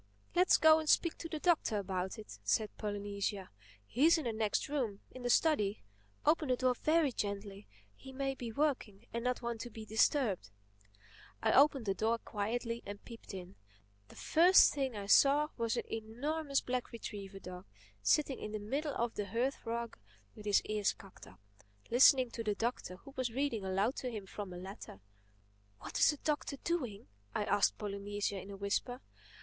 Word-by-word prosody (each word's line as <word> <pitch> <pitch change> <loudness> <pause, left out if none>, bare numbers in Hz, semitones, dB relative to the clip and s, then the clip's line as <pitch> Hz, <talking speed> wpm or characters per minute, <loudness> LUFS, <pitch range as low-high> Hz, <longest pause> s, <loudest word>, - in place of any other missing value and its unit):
"Humph!—Let's 360 +1 +4
go 315 0 +7
and 310 -1 -3
speak 335 - +4
to 330 - -6
the 315 - -3
Doctor 310 -9 +2
about 190 -1 -3
it," 215 - -10
said 215 -2 0
Polynesia. 205 -1 -3 0.3
"He's 305 - +4
in 315 - -3
the 235 -3 -2
next 215 -1 0
room—in 255 -3 -4
the 245 - -2
study. 230 -8 +2 0.4
Open 305 -1 +3
the 255 - +4
door 255 0 +2
very 310 +2 +2
gently—he 200 - -7
may 270 0 -2
be 240 -3 -6
working 240 -6 -1
and 235 0 -2
not 250 0 -1
want 235 -1 -3
to 240 - -6
be 220 -1 -9
disturbed." 220 - +1 0.9
I 220 - +3
opened 275 -2 +5
the 195 - +1
door 225 +4 +1
quietly 230 +2 -3
and 205 0 -8
peeped 230 -2 -10
in. 185 +1 -9 0.5
The - - -16
first 350 +4 +6
thing 270 -4 -2
I 200 -1 -5
saw 285 +8 +5
was 230 -2 -1
an - - -1
enormous 275 +7 -2
black 250 -1 -3
retriever 200 -4 -7
dog 180 -1 -9 0.3
sitting 270 - +2
in 210 - -6
the 215 - -2
middle 280 +8 -2
of 235 0 -1
the 205 -1 -3
hearth 240 +7 -1
rug 235 - -3 0.4
with 210 - -9
his 205 - +4
ears 210 -1 0
cocked 195 -2 -14
up, - - -16 0.5
listening 255 0 +6
to 230 - -5
the 210 -2 0
Doctor 225 -5 -3
who 275 +9 -14
was 255 -2 -1
reading 245 -4 -1
aloud 195 +6 0
to 255 - -3
him 215 -4 -6
from 195 0 -7
a 180 - -7
letter. 190 - -9 0.8
"What - - -5
is - - +6
the 295 - 0
Doctor 295 -1 -2
doing?" 255 - -2 0.3
I - - +1
asked 205 - +2
Polynesia 205 -1 -3
in 195 - -11
a 200 - -7
whisper. 200 +5 -2
230 Hz, 180 wpm, -34 LUFS, 200-270 Hz, 0.9 s, go